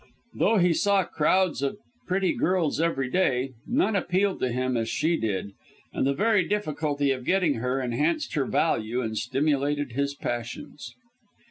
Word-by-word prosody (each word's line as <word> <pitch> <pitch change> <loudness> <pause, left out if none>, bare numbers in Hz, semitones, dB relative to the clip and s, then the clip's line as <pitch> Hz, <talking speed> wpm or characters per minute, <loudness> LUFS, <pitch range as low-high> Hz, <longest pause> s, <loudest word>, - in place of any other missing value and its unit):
Though 225 +1 +2
he 180 -2 +4
saw 200 +3 +2
crowds 175 +1 +1
of 140 +8 -1 0.3
pretty 185 0 +1
girls 170 -5 0
every 135 -6 0
day, 135 -5 +1 0.2
none 240 -3 +1
appealed 190 +1 +1
to 130 - 0
him 130 +1 -1
as 115 -1 -1
she 160 +8 +1
did 100 - -2 0.4
and - - 0
the 140 - +2
very 210 0 +3
difficulty 150 -8 0
of 130 -1 -3
getting 175 -6 +1
her 125 +2 0
enhanced 135 +6 -1
her 145 -4 +1
value 120 -6 0
and 110 -1 -3
stimulated 145 +1 0
his 140 +3 -1
passions. 120 +3 -6
145 Hz, 155 wpm, -26 LUFS, 130-185 Hz, 0.4 s, he